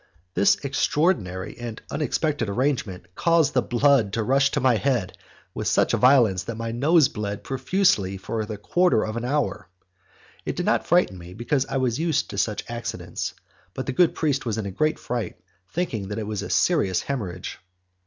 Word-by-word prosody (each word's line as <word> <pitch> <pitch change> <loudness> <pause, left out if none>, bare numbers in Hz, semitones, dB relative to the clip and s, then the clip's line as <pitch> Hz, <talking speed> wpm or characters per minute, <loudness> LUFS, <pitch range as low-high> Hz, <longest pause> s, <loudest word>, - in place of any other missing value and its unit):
This 100 - +4
extraordinary 135 - 0
and 120 -2 -6
unexpected 145 -4 -1
arrangement 100 -7 -2
caused 165 - +2
the 125 - +3
blood 120 -4 +2
to 115 - 0
rush 135 +4 +3
to 145 - -1
my 130 -3 +3
head 125 -6 0 0.4
with - - -3
such - - +3
violence 120 -8 +4
that 115 -1 -5
my 115 0 -3
nose 145 +5 +4
bled 105 -1 -5
profusely 135 - +1
for 110 +4 -3
a 105 0 -5
quarter 175 - +2
of 110 0 -4
an 115 - -3
hour. 125 -7 -1 0.8
It - - -3
did - - -2
not - - +1
frighten 90 0 +2
me, 90 +1 -11
because 130 +4 0
I - - -2
was 130 -1 0
used 160 -2 0
to 100 - -3
such 105 +1 -1
accidents, 120 0 -5 0.4
but 130 - -4
the 130 - -2
good 170 +5 +3
priest 145 -2 0
was 115 -3 -2
in 110 - -3
a 100 - -4
great 155 +11 0
fright, 120 -2 -4 0.3
thinking 115 - -2
that 105 - -5
it 110 - -3
was 105 -1 -3
a - - -6
serious 105 - +2
haemorrhage. 95 -10 -5
120 Hz, 185 wpm, -24 LUFS, 105-140 Hz, 0.8 s, This